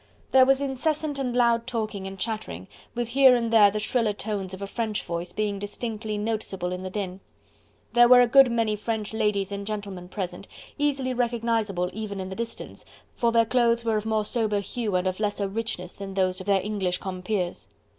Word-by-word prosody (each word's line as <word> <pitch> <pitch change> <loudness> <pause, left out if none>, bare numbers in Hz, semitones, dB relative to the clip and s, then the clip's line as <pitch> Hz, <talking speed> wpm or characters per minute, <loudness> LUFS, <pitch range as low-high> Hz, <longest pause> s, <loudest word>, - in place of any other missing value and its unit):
There 260 -1 +6
was 270 0 +4
incessant 290 +2 -1
and 250 -3 -2
loud 235 -1 +3
talking 215 -5 -3
and 195 0 -7
chattering, 190 - -4 0.3
with 240 -1 -2
here 260 0 +6
and 230 -1 -1
there 210 -3 +8
the 205 - -3
shriller 215 0 0
tones 205 -2 -4
of 190 - -7
a - - -1
French 215 0 -3
voice 170 +1 -4
being 205 -2 -2
distinctly 215 +1 -4
noticeable 205 -4 -3
in 180 0 -4
the 185 - -5
din. 190 -1 -4 0.7
There 240 0 +7
were 250 0 +8
a - - +6
good 260 +1 +6
many 225 -2 +1
French 215 0 -3
ladies 210 -3 0
and 200 0 -5
gentlemen 200 -4 -5
present, 185 -1 -5 0.3
easily 275 -3 0
recognisable, 230 -6 0
even 210 -2 -5
in 185 0 -4
the 190 - -6
distance, 230 +1 -6 0.3
for 235 -1 +1
their 230 0 +4
clothes 235 -1 +2
were 225 -1 +2
of 215 +1 -3
more 215 -1 +1
sober 215 -3 0
hue 210 0 -3
and 180 0 +1
of 185 +1 -1
lesser 205 -1 -1
richness 195 -4 -4
than 195 -1 -7
those 185 -1 +1
of 185 - -10
their 195 -1 +3
English 195 -3 -1
compeers. 185 -1 -3
215 Hz, 195 wpm, -26 LUFS, 195-235 Hz, 0.7 s, there